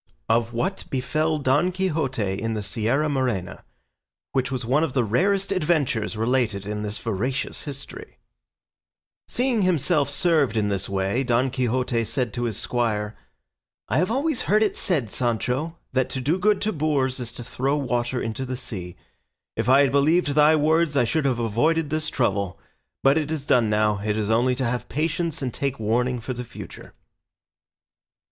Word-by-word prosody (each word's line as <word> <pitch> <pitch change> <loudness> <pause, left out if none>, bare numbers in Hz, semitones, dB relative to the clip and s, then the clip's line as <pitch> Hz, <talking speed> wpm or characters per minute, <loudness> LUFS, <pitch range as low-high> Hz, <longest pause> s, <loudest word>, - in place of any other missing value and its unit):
OF 115 0 +2
WHAT 185 +12 -2
BEFELL 155 +4 0
DON 145 +6 +2
QUIXOTE 140 - -1
IN 115 0 -1
THE 105 -1 -3
SIERRA 115 +9 0
MORENA, 125 -10 -2 0.7
WHICH 130 -1 0
WAS 130 -2 -3
ONE 135 +6 +2
OF 150 -6 -1
THE 125 - +2
RAREST 195 - +1
ADVENTURES 150 - 0
RELATED 110 -4 0
IN 105 0 -3
THIS 105 0 -3
VERACIOUS 115 +5 -2
HISTORY 145 - -8 1.1
Seeing 245 -3 +1
himself 155 -5 +2
served 145 - +2
in 105 -1 +1
this 100 -1 -2
way, 100 +6 0
Don 125 +1 +1
Quixote 125 -1 0
said 125 -1 -2
to 120 0 -2
his 115 -4 -2
squire, 110 -3 -1 0.7
"I - - +2
have 180 - +1
always 275 +3 0
heard 215 +2 +5
it 210 - 0
said, 150 - 0
Sancho, 125 +7 -1 0.2
that 130 -1 +1
to 130 - -3
do 150 +8 0
good 210 +1 +2
to 215 +1 0
boors 140 -5 0
is 120 -2 -5
to 120 - -7
throw 135 +4 -1
water 125 -2 -1
into 115 +3 -3
the 130 -1 -4
sea. 90 -8 -6 0.6
If 115 +2 -1
I 135 +2 +7
had 140 - +3
believed 150 +4 +3
thy 150 +2 +5
words, 155 0 +2
I 125 - +5
should 140 +6 0
have 130 -3 +2
avoided 145 +8 +1
this 155 0 -1
trouble; 100 -7 -1 0.4
but 135 +3 +5
it 150 -1 -3
is 155 -3 -3
done 120 -6 +3
now, 105 -1 +2
it 105 0 0
is 110 0 0
only 125 +3 +3
to 130 0 -1
have 120 +1 -2
patience 160 +2 -1
and 125 -3 -2
take 140 -1 -2
warning 120 +3 0
for 125 +3 -4
the 125 0 -5
future." 120 - -11
130 Hz, 175 wpm, -24 LUFS, 115-155 Hz, 1.1 s, I